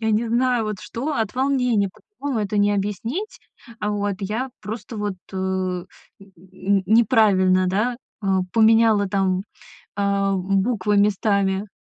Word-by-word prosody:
я 220 Hz, -1 st, 0 dB
не 220 Hz, +2 st, +1 dB
знаю 245 Hz, 0 st, +1 dB
вот 215 Hz, -1 st, -3 dB
что, 275 Hz, +7 st, -4 dB
от 220 Hz, -5 st, -2 dB
волнения, 250 Hz, -6 st, +1 dB
по-другому 255 Hz, +3 st, -5 dB
это 205 Hz, +1 st, -3 dB
не 205 Hz, 0 st, +3 dB
объяснить. 215 Hz, -, -3 dB, 0.4 s
Вот 205 Hz, -1 st, -1 dB
я 215 Hz, +7 st, -2 dB
просто 220 Hz, +2 st, -7 dB
вот, 205 Hz, -2 st, -2 dB, 0.2 s
э, -, -, -5 dB
н 185 Hz, -1 st, -2 dB, 0.3 s
н 195 Hz, +1 st, -3 dB
неправильно, 200 Hz, -5 st, +4 dB
да, 215 Hz, +6 st, 0 dB, 0.3 s
э, -, -, -4 dB, 0.3 s
поменяла, 225 Hz, -2 st, +4 dB
там, 190 Hz, -1 st, 0 dB, 0.5 s
а, 200 Hz, -1 st, +1 dB
буквы 195 Hz, +2 st, 0 dB
местами. 200 Hz, -1 st, +1 dB
205 Hz, 130 wpm, -22 LUFS, 195-225 Hz, 0.5 s, неправильно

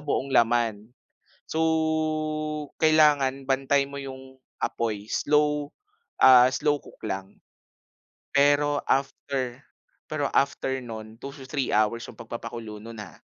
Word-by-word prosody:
buong 140 Hz, -2 st, -2 dB
laman. 115 Hz, -2 st, +2 dB, 0.6 s
So, 160 Hz, -, -2 dB, 1.2 s
kailangan 150 Hz, -4 st, +4 dB
bantay 140 Hz, +1 st, +2 dB
mo 140 Hz, -, -7 dB
'yung 130 Hz, -1 st, -9 dB, 0.2 s
apoy, 110 Hz, -2 st, -2 dB
slow, 150 Hz, 0 st, +1 dB, 0.5 s
ah, 125 Hz, -1 st, +8 dB
slow 145 Hz, +2 st, 0 dB
cook -, -, -16 dB
lang. 95 Hz, -2 st, -5 dB, 1.0 s
Pero 145 Hz, +1 st, +3 dB
after 135 Hz, -2 st, -1 dB, 0.5 s
pero 145 Hz, -2 st, 0 dB
after 135 Hz, -1 st, +1 dB
nun, 110 Hz, -2 st, -8 dB
2 140 Hz, -, -5 dB
to 135 Hz, -2 st, -11 dB
3 135 Hz, -2 st, -1 dB
hours 110 Hz, +2 st, +2 dB
'yung -, -, -18 dB
pag-papakulo 115 Hz, -1 st, -7 dB
nun, 115 Hz, 0 st, -10 dB
ah. 95 Hz, -7 st, -10 dB
130 Hz, 115 wpm, -26 LUFS, 115-145 Hz, 1.2 s, ah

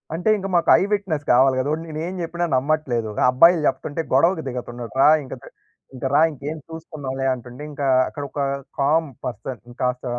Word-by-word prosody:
అంటే 175 Hz, +6 st, 0 dB
ఇంక 195 Hz, 0 st, -4 dB
మాకు 170 Hz, -, +2 dB
ఐ -, -, -1 dB
విట్నెస్ 190 Hz, -8 st, -1 dB
కావాలి 130 Hz, +2 st, +5 dB
గదా! 130 Hz, -, -1 dB
ఓడు 160 Hz, -, -3 dB
నేను 155 Hz, 0 st, -6 dB
ఏం 185 Hz, -, -5 dB
జెప్పినా 170 Hz, +1 st, -2 dB
నమ్మట్లేదు. 130 Hz, -5 st, 0 dB, 0.2 s
అబ్బాయిలు 165 Hz, +5 st, +5 dB
జెప్తుంటే 145 Hz, +3 st, -1 dB
గొడవకు 165 Hz, +5 st, +3 dB
దిగుతున్నడు. 120 Hz, -2 st, -6 dB
రా 150 Hz, -, +7 dB
ఇంకా 130 Hz, -, -7 dB
ద -, -, -12 dB, 0.5 s
ఇంకా 130 Hz, +1 st, -3 dB
రా 145 Hz, -, +5 dB
ఇంకేం 150 Hz, +2 st, -6 dB
చూసుకుందాంలే 145 Hz, -5 st, -6 dB
అంటుంటే, 125 Hz, +2 st, -9 dB
ఇంకా 140 Hz, -1 st, -4 dB, 0.2 s
అక్కడ 145 Hz, -, -7 dB
ఒక 145 Hz, -, -7 dB, 0.4 s
కామ్ 155 Hz, +4 st, +2 dB, 0.2 s
పర్సన్ 120 Hz, +1 st, -5 dB, 0.2 s
కాస్త 125 Hz, 0 st, -1 dB
145 Hz, 175 wpm, -22 LUFS, 130-160 Hz, 0.5 s, రా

